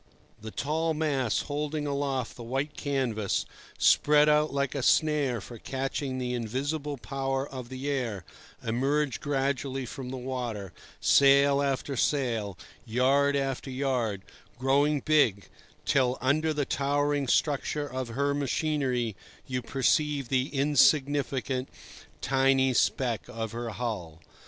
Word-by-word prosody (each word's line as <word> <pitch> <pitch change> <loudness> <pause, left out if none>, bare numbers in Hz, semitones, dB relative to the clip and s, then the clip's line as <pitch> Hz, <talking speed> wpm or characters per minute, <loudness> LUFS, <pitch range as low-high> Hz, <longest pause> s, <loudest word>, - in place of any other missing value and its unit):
The 110 - -6
tall 160 +6 -1
masts 140 -7 0
holding 150 +1 -3
aloft 140 -3 -2
the - - -10
white 135 +5 -3
canvas, 125 -8 -1 0.3
spread 150 0 +5
out 150 0 +3
like 140 -1 -1
a 140 - -2
snare 145 -3 +2
for 115 +3 -10
catching 135 +1 -3
the 125 -1 -2
invisible 140 +5 -2
power 135 +1 -2
of 130 -4 -8
the 130 +2 -5
air, 120 - -2 0.4
emerge 135 +4 0
gradually 135 -2 -1
from 125 +1 -7
the 130 - -5
water, 120 -7 -4 0.3
sail 140 0 +5
after 140 0 -1
sail, 115 - 0 0.3
yard 135 +5 +2
after 135 -1 -2
yard, 125 -7 -1 0.3
growing 140 +3 +2
big, 135 -11 +2 0.4
till, 130 -2 +2
under 155 +4 +1
the 145 -2 -1
towering 145 +1 0
structure 145 +2 +1
of 130 -2 -4
her 140 +5 0
machinery, 135 -5 -1 0.3
you 125 -1 -3
perceive 140 +1 +1
the 130 0 +1
insignificant, 140 -2 +2 0.5
tiny 135 -1 +3
speck 120 -1 +1
of 115 -1 -5
her 120 0 -4
hull. 105 -10 -4
135 Hz, 125 wpm, -28 LUFS, 125-145 Hz, 0.5 s, spread